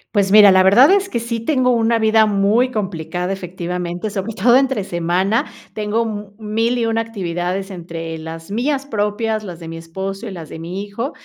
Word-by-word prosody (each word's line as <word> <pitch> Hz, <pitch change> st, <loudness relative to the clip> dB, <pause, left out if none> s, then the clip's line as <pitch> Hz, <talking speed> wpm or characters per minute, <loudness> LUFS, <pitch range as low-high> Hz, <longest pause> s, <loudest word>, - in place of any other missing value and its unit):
Pues 195 Hz, -1 st, +2 dB
mira, 210 Hz, -1 st, +9 dB
la 185 Hz, 0 st, +5 dB
verdad 235 Hz, -, +7 dB
es 390 Hz, -1 st, +2 dB
que 235 Hz, -, -1 dB
sí 230 Hz, -1 st, -3 dB
tengo 255 Hz, -1 st, +2 dB
una 230 Hz, -1 st, +2 dB
vida 220 Hz, 0 st, +4 dB
muy 210 Hz, +5 st, +2 dB
complicada 180 Hz, -3 st, -3 dB
efectivamente, 180 Hz, +1 st, -4 dB
sobre 200 Hz, +1 st, -4 dB
todo 240 Hz, +6 st, +4 dB
entre 265 Hz, -7 st, +2 dB
semana. 180 Hz, +5 st, 0 dB, 0.3 s
Tengo 215 Hz, +2 st, -1 dB
mu 210 Hz, -2 st, -6 dB
mil 225 Hz, +3 st, 0 dB
y 235 Hz, -, 0 dB
una 225 Hz, 0 st, +1 dB
actividades 190 Hz, -3 st, -3 dB
entre 165 Hz, -3 st, -6 dB
las 160 Hz, +2 st, -8 dB
mías 270 Hz, +6 st, -1 dB
propias, 215 Hz, -1 st, -1 dB
las 175 Hz, -5 st, -8 dB
de 165 Hz, -, -9 dB
mi 165 Hz, -, -7 dB
esposo 190 Hz, +6 st, -6 dB
y 205 Hz, -, -6 dB
las 165 Hz, -4 st, -8 dB
de -, -, -9 dB
mi 175 Hz, +4 st, -5 dB
hijo, 230 Hz, +7 st, -4 dB
205 Hz, 190 wpm, -19 LUFS, 180-230 Hz, 0.3 s, mira